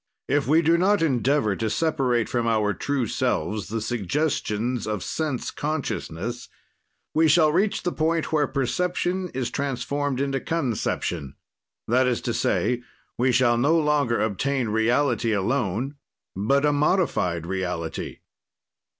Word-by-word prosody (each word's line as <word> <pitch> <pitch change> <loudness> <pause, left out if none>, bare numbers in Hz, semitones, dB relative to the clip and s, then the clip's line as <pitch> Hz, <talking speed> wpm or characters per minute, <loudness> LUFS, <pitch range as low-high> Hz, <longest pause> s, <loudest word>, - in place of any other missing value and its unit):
"If 140 0 +1
we 160 +4 +4
do 165 +2 +4
not 200 0 +3
endeavor 135 -5 +2
to 110 +1 -2
separate 125 -5 +1
from 120 -2 -1
our 105 -2 +2
true 135 +6 -1
selves 100 0 -1
the 115 +1 -2
suggestions 120 - -1
of 105 -4 -2
sense 150 -6 -2
consciousness, 120 - -4 0.6
we 160 +1 +4
shall 155 0 +5
reach 195 +6 +1
the 175 - 0
point 160 0 0
where 150 -2 +3
perception 180 +7 -1
is 125 -2 -2
transformed 140 0 -2
into 135 -1 0
conception, 115 - -2 0.5
that 125 +3 +3
is 125 -2 +1
to - - -2
say, 125 -1 0 0.3
we 125 +2 +2
shall 120 -1 +3
no 150 +7 +3
longer 150 -6 +2
obtain 120 +4 0
reality 115 +1 +2
alone, 120 +5 -1 0.4
but 135 +9 +2
a 145 - +3
modified 145 - +1
reality. 90 -3 -4
130 Hz, 135 wpm, -24 LUFS, 110-150 Hz, 0.6 s, shall